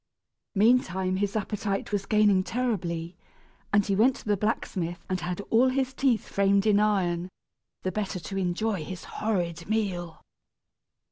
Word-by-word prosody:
Meantime 190 -4 +3
his 205 +1 -1
appetite 205 -1 -2
was 200 -1 -1
gaining 210 -3 +4
terribly, 180 -8 -2 0.6
and 205 -1 +4
he 200 - +1
went 245 +6 +4
to - - -12
the 210 -1 +2
blacksmith 180 -4 -2
and 185 -1 -1
had 180 +3 -3
all 235 +3 +5
his 260 0 0
teeth 260 -4 +1
framed 200 0 +2
in 210 -2 +4
iron, 185 -4 +1 0.5
the 185 - -1
better 200 -3 -3
to 175 +4 -7
enjoy 190 0 -1
his 180 +2 -7
horrid 175 -5 -2
meal. 185 -6 -2
200 Hz, 145 wpm, -27 LUFS, 180-215 Hz, 0.6 s, all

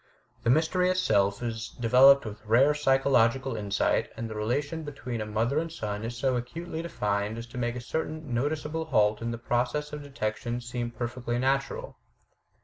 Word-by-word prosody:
The 115 - 0
mystery 165 +6 +3
itself 105 - +2
is 115 -1 -3
developed 130 +4 +6
with 105 0 -7
rare 130 +7 +5
psychological 135 -3 +2
insight, 100 -2 0
and 115 - -3
the 110 - -6
relation 140 +9 -1
between 135 -6 -5
a 105 - -4
mother 115 +7 +1
and 165 0 -3
son 105 -8 -4
is 120 +1 -4
so 130 +1 +1
acutely 160 +7 -4
defined 105 -9 -2
as 115 - -6
to 125 - -4
make 120 0 -1
a 125 - -4
certain 155 +1 -4
noticeable 150 +5 -1
halt 105 -7 +2
in 115 - -2
the 115 - -3
process 125 +6 -1
of 150 - -5
detection 120 -3 -3
seem 120 0 -4
perfectly 120 +1 -3
natiural. 135 +2 -1
120 Hz, 170 wpm, -28 LUFS, 115-145 Hz, -, developed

